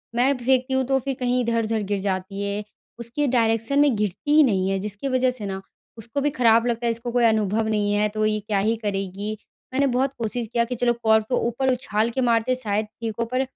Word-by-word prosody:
मैं 255 +4 +3
फेंकती 255 +1 +1
हूँ 265 0 +2
तो 270 0 +2
फिर 270 +1 -3
कहीं 250 0 +1
इधर-उधर 230 -2 0
गिर 200 - +1
जाती 195 0 -3
है 200 +1 -2 0.4
उसकी 240 +5 -2
डायरेक्शन 230 +2 +1
में 290 -4 +4
गिरती 210 - -2
ही 310 - +8
नहीं 190 -7 +1
है 195 - 0
जिसकी 205 +6 -4
वजह 255 -1 +2
से 240 -5 -6
न 190 -1 -4 0.4
उसको 230 +5 -4
भी 295 - +2
खराब 235 -5 +3
लगता 235 0 -1
है 235 - +2
इसको 235 +1 -5
कोई 245 0 +2
अनुभव 220 -1 +2
नहीं 210 -1 0
है 210 +1 +2
तो 215 +1 -1
ये 215 0 +1
क्या 210 -1 -1
ही 220 +3 +1
करेगी। 200 +1 -3 0.4
मैंने 275 +2 +2
बहुत 260 +1 0
कोशिश 230 +1 -2
किया 235 - +3
कि 250 +2 -4
चलो 240 0 +2
कॉर्क 220 -1 +4
को 250 - +1
ऊपर 260 +3 0
उछाल 225 -3 -1
के - - +2
मारते 235 0 +2
हैं 255 - +2
शायद 210 -1 -1 0.2
ठीक 225 -1 -2
हो 230 - +1
पर 255 - +2
230 Hz, 235 wpm, -23 LUFS, 210-255 Hz, 0.4 s, ही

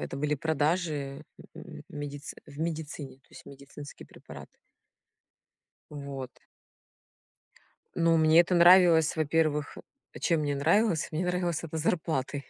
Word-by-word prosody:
это - - -6
были 150 +1 -1
продажи, 150 -2 -2 0.3
м, 70 - -11
в - - -18
медиц 145 0 -7
в 145 0 -11
медицине, 160 -4 -5
то - - -35
есть - - -14
медицинские 140 +1 -12
препараты. - - -13 1.4
Вот. 140 -3 -7 1.7
Но 165 0 +3
мне 160 +1 +5
это 175 +1 +1
нравилось, 170 -3 +6
во-первых 155 -1 0 0.4
чем 165 -3 +1
мне 145 -1 -1
нравилось? 165 +5 +1
Мне 165 +3 -2
нравилось 180 -2 -1
это 160 0 -6
зарплатой, 150 -4 -2
155 Hz, 120 wpm, -28 LUFS, 145-165 Hz, 1.7 s, нравилось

